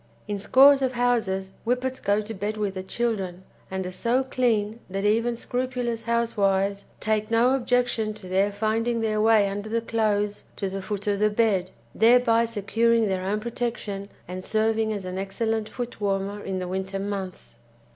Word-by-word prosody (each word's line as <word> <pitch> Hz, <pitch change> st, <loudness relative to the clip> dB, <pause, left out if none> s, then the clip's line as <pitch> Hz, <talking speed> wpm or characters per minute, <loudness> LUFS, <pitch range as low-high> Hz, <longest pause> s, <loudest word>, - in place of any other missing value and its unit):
In 205 Hz, -1 st, -2 dB
scores 275 Hz, +6 st, +6 dB
of 260 Hz, -1 st, +1 dB
houses 225 Hz, -6 st, 0 dB
Whippets 250 Hz, +2 st, -1 dB
go 205 Hz, +1 st, +1 dB
to 215 Hz, +1 st, -7 dB
bed 210 Hz, +2 st, -3 dB
with 205 Hz, -2 st, -1 dB
the 190 Hz, -, -4 dB
children, 190 Hz, -3 st, -2 dB, 0.3 s
and 190 Hz, 0 st, -3 dB
are 180 Hz, -, -4 dB
so 240 Hz, +7 st, +1 dB
clean 230 Hz, -4 st, 0 dB
that 195 Hz, +2 st, -2 dB
even 230 Hz, +3 st, +2 dB
scrupulous 245 Hz, -1 st, -2 dB
housewives 200 Hz, -4 st, +1 dB
take 215 Hz, 0 st, 0 dB
no 230 Hz, +2 st, +4 dB
objection 245 Hz, -4 st, +1 dB
to 210 Hz, -3 st, -11 dB
their 195 Hz, +2 st, +2 dB
finding 225 Hz, +3 st, 0 dB
their 215 Hz, -1 st, +1 dB
way 220 Hz, -2 st, +5 dB
under 205 Hz, +2 st, -4 dB
the 230 Hz, +1 st, +1 dB
clothes 210 Hz, -3 st, 0 dB
to 195 Hz, -1 st, -3 dB
the 195 Hz, 0 st, -4 dB
foot 205 Hz, +1 st, -4 dB
of 205 Hz, -1 st, 0 dB
the 210 Hz, 0 st, +4 dB
bed, 205 Hz, -4 st, +1 dB, 0.2 s
thereby 230 Hz, 0 st, +5 dB
securing 230 Hz, +1 st, +1 dB
their 185 Hz, -1 st, -1 dB
own 200 Hz, +3 st, 0 dB
protection 220 Hz, -4 st, -4 dB, 0.2 s
and 185 Hz, +1 st, -6 dB
serving 220 Hz, +1 st, +1 dB
as 200 Hz, -3 st, -4 dB
an 185 Hz, +1 st, -4 dB
excellent 220 Hz, +3 st, -2 dB
footwarmer 205 Hz, -4 st, -3 dB
in 190 Hz, -1 st, -3 dB
the 180 Hz, -1 st, -3 dB
winter 190 Hz, +1 st, -3 dB
months. 195 Hz, -2 st, -5 dB
215 Hz, 170 wpm, -25 LUFS, 195-230 Hz, 0.3 s, scores